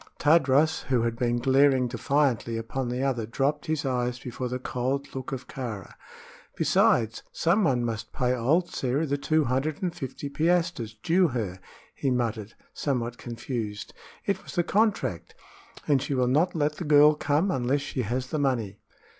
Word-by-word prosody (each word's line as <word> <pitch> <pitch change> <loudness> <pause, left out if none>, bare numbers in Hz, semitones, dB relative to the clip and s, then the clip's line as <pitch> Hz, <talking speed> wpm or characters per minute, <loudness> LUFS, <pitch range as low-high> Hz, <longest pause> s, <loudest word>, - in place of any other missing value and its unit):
Tadros, 150 0 +3
who 125 -3 +1
had 115 0 -1
been 120 0 0
glaring 130 +1 +4
defiantly 120 -2 0
upon 120 +3 -3
the 125 +2 -2
other, 120 -5 -1
dropped 140 +5 -1
his 155 -2 -1
eyes 125 -2 -1
before 125 +1 -5
the 125 - -2
cold 130 +2 -3
look 130 -1 -5
of 135 -1 -5
Kāra. 115 -8 -6 0.6
"Besides, 115 -2 +2
some 185 +6 +2
one 125 -3 +1
must 115 -2 -4
pay 125 0 0
old 145 +9 +2
Sĕra 140 +5 -1
the 140 0 -1
two 155 +2 +2
hundred 140 +6 -1
and 180 -2 -1
fifty 135 +2 -6
piastres 165 -6 0
due 180 +2 +4
her," 110 - -3 0.3
he 135 - -1
muttered, 115 -4 -2 0.2
somewhat 120 -4 -2
confused. 115 -3 -5 0.3
"It 200 - 0
was - - -10
the 175 - +2
contract, 195 - 0 0.5
and 140 -3 +3
she 140 0 -2
will 125 -1 +2
not 155 +9 +2
let 150 -1 0
the - - -4
girl 150 0 +6
come 150 +5 +1
unless 130 -1 0
she 135 -2 -3
has 125 +3 -2
the 155 - -1
money." 115 -8 -1
130 Hz, 170 wpm, -27 LUFS, 120-150 Hz, 0.6 s, girl